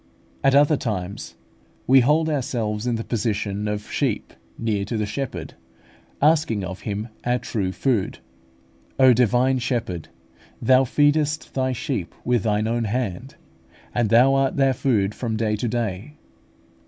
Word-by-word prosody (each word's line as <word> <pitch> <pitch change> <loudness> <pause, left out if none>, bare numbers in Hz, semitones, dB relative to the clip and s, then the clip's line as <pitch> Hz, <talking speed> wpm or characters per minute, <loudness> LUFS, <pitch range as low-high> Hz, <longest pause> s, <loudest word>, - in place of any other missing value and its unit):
At 135 0 +4
other 145 +1 +5
times 100 -5 -4 0.5
we 135 +1 +6
hold 150 +6 +3
ourselves 120 -7 -2
in 120 - +1
the 115 - -3
position 105 -3 -2
of 105 0 -4
sheep - - -1 0.2
near 110 -3 -1
to 110 +3 -3
the 105 - 0
Shepherd, 120 +5 -5 0.7
asking 150 -10 +3
of 95 +1 -6
Him 105 +2 -4
our 120 +1 +1
true 100 -6 -2
food. 115 -1 -1 0.8
O 130 -1 +7
Divine 125 +2 +2
Shepherd! 115 - -3 0.5
Thou 130 0 +4
feedest 150 +3 +1
Thy 130 -1 0
sheep 125 - -4
with 120 -2 +2
Thine 105 0 0
own 115 0 0
hand, 120 +2 -3 0.6
and 120 -3 +1
Thou 125 +4 +5
art 135 -1 +1
their 135 -1 +3
food 105 -6 +1
from 115 -2 -3
day 110 -1 0
to 115 +3 -2
day. 115 +3 -3
120 Hz, 145 wpm, -23 LUFS, 105-135 Hz, 0.8 s, O